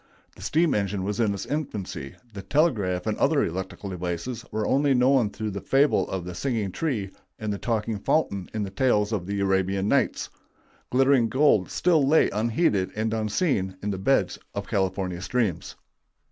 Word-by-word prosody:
The -, -, -14 dB
steam 165 Hz, 0 st, +2 dB
engine 100 Hz, -2 st, -1 dB
was 105 Hz, +2 st, -3 dB
in 110 Hz, -3 st, +2 dB
its 100 Hz, -, -4 dB
infancy; 100 Hz, -, -4 dB, 0.2 s
the 100 Hz, -, -6 dB
telegraph 105 Hz, -, +1 dB
and 110 Hz, -1 st, 0 dB
other 145 Hz, 0 st, +3 dB
electrical 95 Hz, +3 st, -4 dB
devices 90 Hz, +6 st, -4 dB
were 110 Hz, 0 st, -1 dB
only 140 Hz, 0 st, +3 dB
known 125 Hz, -3 st, +4 dB
through 110 Hz, 0 st, -4 dB
the 100 Hz, 0 st, -5 dB
fable 140 Hz, +2 st, +2 dB
of 95 Hz, -2 st, -4 dB
the 90 Hz, -, -6 dB
singing 110 Hz, -1 st, -2 dB
tree 110 Hz, -, -2 dB, 0.3 s
and 110 Hz, -1 st, -3 dB
the 100 Hz, -, -5 dB
talking 110 Hz, -2 st, -1 dB
fountain 100 Hz, -, 0 dB
in 110 Hz, -1 st, -2 dB
the 95 Hz, -, -5 dB
tales 110 Hz, -5 st, +2 dB
of 95 Hz, -5 st, -2 dB
the 100 Hz, 0 st, -2 dB
Arabian 95 Hz, 0 st, +1 dB
Nights; 130 Hz, 0 st, +1 dB, 0.6 s
glittering 130 Hz, -2 st, +3 dB
gold 130 Hz, -8 st, +3 dB
still 170 Hz, -5 st, +2 dB
lay 150 Hz, +4 st, +4 dB
unheeded 110 Hz, -, +1 dB
and 110 Hz, +1 st, -1 dB
unseen 110 Hz, -, 0 dB
in 105 Hz, -, -1 dB
the 95 Hz, -, -4 dB
beds 95 Hz, -, +1 dB, 0.2 s
of -, -, -4 dB
California 95 Hz, -2 st, -1 dB
streams. 110 Hz, -3 st, -1 dB
105 Hz, 175 wpm, -25 LUFS, 95-130 Hz, 0.6 s, known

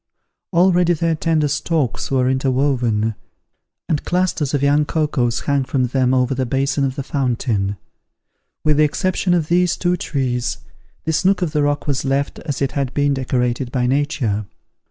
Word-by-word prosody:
Already 175 Hz, -1 st, +4 dB
their 165 Hz, 0 st, 0 dB
tender 155 Hz, -1 st, +1 dB
stalks 145 Hz, -1 st, -1 dB
were 130 Hz, -2 st, +2 dB
interwoven, 130 Hz, -4 st, +1 dB, 0.7 s
and 155 Hz, -4 st, -1 dB
clusters 175 Hz, -5 st, 0 dB
of 140 Hz, -, -1 dB
young 145 Hz, +1 st, +4 dB
cocoas 145 Hz, -6 st, 0 dB
hung 140 Hz, -1 st, +1 dB
from 130 Hz, 0 st, 0 dB
them 130 Hz, 0 st, +1 dB
over 130 Hz, 0 st, +2 dB
the 130 Hz, -1 st, -2 dB
basin 135 Hz, +2 st, 0 dB
of 130 Hz, -1 st, -1 dB
the 140 Hz, -, -4 dB
fountain. 115 Hz, -8 st, -1 dB, 0.9 s
With 150 Hz, -1 st, +3 dB
the 155 Hz, -, +5 dB
exception 180 Hz, +4 st, +1 dB
of 165 Hz, -3 st, 0 dB
these 175 Hz, 0 st, +2 dB
two 180 Hz, 0 st, +1 dB
trees, 125 Hz, -6 st, -2 dB, 0.5 s
this 160 Hz, 0 st, 0 dB
nook 190 Hz, -1 st, +3 dB
of 165 Hz, -, -1 dB
the 150 Hz, -, +1 dB
rock 145 Hz, 0 st, 0 dB
was 140 Hz, -2 st, -1 dB
left 135 Hz, +1 st, -1 dB
as 145 Hz, -4 st, -3 dB
it 135 Hz, -, 0 dB
had 135 Hz, -2 st, -2 dB
been 145 Hz, -1 st, +2 dB
decorated 125 Hz, -1 st, -1 dB
by 125 Hz, -2 st, 0 dB
nature. 125 Hz, -6 st, 0 dB
140 Hz, 165 wpm, -20 LUFS, 130-155 Hz, 0.9 s, the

